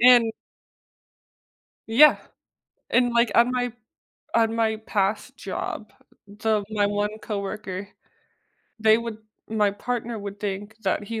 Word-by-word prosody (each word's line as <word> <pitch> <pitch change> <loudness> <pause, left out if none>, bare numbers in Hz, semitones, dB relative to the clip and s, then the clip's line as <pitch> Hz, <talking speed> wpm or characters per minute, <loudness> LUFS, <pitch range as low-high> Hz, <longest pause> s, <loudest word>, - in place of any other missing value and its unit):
and 240 -2 +7 1.6
Yeah, 270 +7 +7 0.7
and, 245 +1 +3
like, 235 -2 +3
on 240 +1 +5
my 245 -1 -1 0.6
on 225 -1 +3
my 225 -1 +2
past 200 0 -1
job - - -5 0.4
the 210 +1 0
my 210 -2 +1
one 205 +1 -1
coworker, 200 -2 -5 0.9
they 220 0 +6
would 230 -2 -5 0.3
my 210 -2 +2
partner 235 +2 -3
would 200 0 -7
think 205 +1 -4
that 195 +1 0
he 225 +2 -4
220 Hz, 120 wpm, -25 LUFS, 205-230 Hz, 1.6 s, and